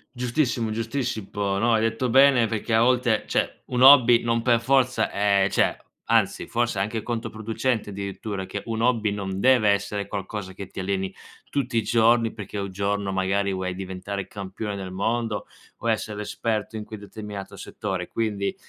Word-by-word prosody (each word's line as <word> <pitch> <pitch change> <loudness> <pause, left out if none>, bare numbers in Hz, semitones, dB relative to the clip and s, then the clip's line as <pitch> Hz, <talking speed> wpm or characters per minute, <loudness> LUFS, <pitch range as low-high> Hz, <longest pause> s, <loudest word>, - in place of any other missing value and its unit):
Giustissimo, 120 -2 0
giustissimo, 110 -4 -2
no, 115 +3 +2
hai 110 - +3
detto 115 +3 0
bene 130 -1 +6
perché 110 +1 -3
a 115 - +4
volte 120 -3 +2
cioè - - -1
un 125 -1 -1
hobby 125 -3 +8
non 115 0 0
per 120 -2 +4
forza 125 -3 +2
è 100 -1 +2
cioè - - +2 0.3
anzi - - +2
forse 120 -2 -1
è 95 - +2
anche 110 +2 -3
controproducente 115 +1 -2
addirittura 100 0 -5
che 95 - -5
un 115 0 -2
hobby 115 -4 +2
non 95 -2 -3
deve 125 -2 +4
essere 100 0 0
qualcosa 100 -1 -5
che 100 0 -8
ti - - -9
alleni 95 0 -2 0.4
tutti 130 -4 -1
i 115 - +4
giorni, 115 0 +3
perché 105 -1 -7
un 100 0 -3
giorno 100 +1 -1
magari 95 +1 0
vuoi 95 -1 -2
diventare 95 +1 -5
campione 100 +1 -5
del 95 -2 -6
mondo 110 +3 -2 0.3
o 115 - -2
essere 105 -1 -1
esperto 110 +1 -3
in 110 - -4
quel 110 -1 -9
determinato 105 -2 -8
settore. 95 -2 -4
Quindi 105 -3 -2
110 Hz, 170 wpm, -25 LUFS, 100-115 Hz, 0.4 s, hobby